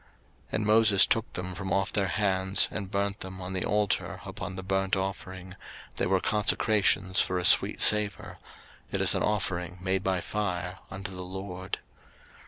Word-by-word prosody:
03:008:028 - - -30 0.4
And 110 - -1
Moses 105 -3 +6
took 115 0 -1
them 90 0 -5
from 95 +1 -6
off 95 +1 0
their 100 -2 0
hands, 95 -1 +3
and 100 -3 -5
burnt 100 0 -2
them 95 0 -8
on 90 0 -6
the 95 - -1
altar 105 -1 -1
upon 95 - -7
the 95 - -7
burnt 95 +1 0
offering: 95 -1 -6 0.4
they - - 0
were 95 0 +2
consecrations 100 -2 +2
for 90 - -1
a 90 - -2
sweet - - +5
savour: 105 -3 +1 0.5
it - - 0
is - - +5
an - - -1
offering 90 -4 -2
made 95 +1 -1
by 95 -1 0
fire 90 -2 -4
unto 95 0 -6
the 90 - -6
LORD. 95 0 -6
95 Hz, 175 wpm, -28 LUFS, 95-100 Hz, 0.5 s, Moses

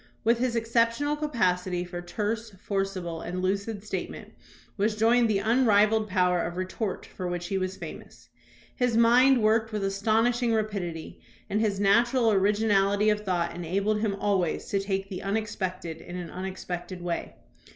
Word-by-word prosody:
With 230 +1 +3
his 250 -1 0
exceptional 230 +5 +1
capacity 185 -11 0
for 175 0 -6
terse, 215 +5 -3
forcible, 190 -5 -3
and 180 +2 -4
lucid 200 +3 -2
statement 215 - -6 0.4
was 210 +1 0
joined 230 +2 +3
the 210 - +2
unrivalled 215 -1 +3
power 180 -2 +2
of 170 +2 -4
re 185 - -1
tort 190 +1 -4
for 185 - -6
which 175 0 -4
he 195 - 0
was 185 0 -3
famous. - - -10 0.5
His 245 -3 +1
mind 245 +2 +5
worked 220 +1 +2
with 210 -2 -2
astonishing 225 +5 +1
rapidity, 195 -7 -4 0.3
and 210 +2 +1
his 205 -3 0
natural 230 +4 +3
originality 205 0 +3
of 210 - 0
thought 175 -4 -1
enabled 195 +5 -1
him 210 -2 0
always 195 -4 0
to 200 - +1
take 195 0 -2
the 190 -2 -6
unexpected 190 -5 -3
in 175 - -9
an 180 -2 -6
unexpected 180 -1 -6
way. 170 -1 -3
200 Hz, 155 wpm, -27 LUFS, 185-225 Hz, 0.5 s, mind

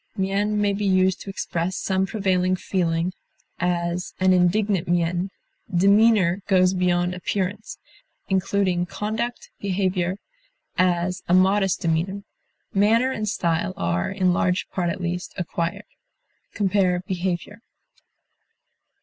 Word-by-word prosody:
Mien 200 +2 0
may 205 -1 +2
be 205 +1 -3
used 185 -2 +2
to - - -8
express 185 -1 -3
some 190 0 0
prevailing 185 -3 +1
feeling; 175 -1 -1 0.5
as, 175 0 -1
"an 185 0 +4
indignant 185 +1 +2
mien." 175 +2 0 0.4
Demeanor 200 0 +4
goes 185 -2 +4
beyond 180 -1 +1
appearance, 195 +3 -3 0.5
including 185 -2 +1
conduct, 220 +5 -4
behavior; 185 -2 -1 0.6
as, 180 0 +1
a 175 - +4
modest 190 0 +3
demeanor. 175 +5 -1 0.5
Manner 225 +6 +3
and 215 -4 -2
style 185 +1 -1
are, 85 0 -1
in 185 -1 +1
large 180 +1 0
part 175 -2 -1
at 170 - -3
least, 175 0 -4
acquired. 170 -1 -3 0.7
Compare 190 -3 +2
BEHAVIOR. 185 +2 -3
185 Hz, 115 wpm, -23 LUFS, 175-200 Hz, 0.7 s, an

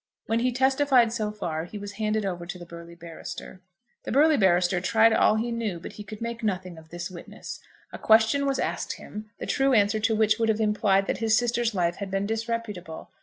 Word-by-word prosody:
When 225 +1 0
he 250 +2 +1
testified 265 -2 +3
so 215 -3 -1
far 165 -6 -4
he 210 - -8
was 205 0 -7
handed 215 0 -1
over 175 -3 -4
to 180 - -6
the 175 - -10
burly 170 0 -11
barrister. 170 +2 -9 0.4
The - - -6
burly 305 +3 +5
barrister 180 -4 +3
tried 225 +4 +4
all 215 - +4
he 230 +2 -1
knew, 220 -7 -3
but - - -9
he 210 - -8
could 210 +2 -10
make 235 0 -4
nothing 185 -5 -3
of 160 0 -18
this 175 +2 -6
witness. 175 - -9 0.3
A - - -7
question 225 +6 +4
was 270 -1 0
asked - - -2
him, 215 +1 -9
the - - -6
true 270 -1 +2
answer 215 -1 +3
to 220 +1 +1
which 215 +1 +2
would 225 -1 +2
have 220 0 +1
implied 210 -2 +2
that - - -2
his 220 -1 +3
sister's 240 -2 0
life 175 -1 0
had 200 -1 -5
been 195 +1 -1
disreputable. 220 -6 -4
215 Hz, 220 wpm, -26 LUFS, 185-230 Hz, 0.4 s, burly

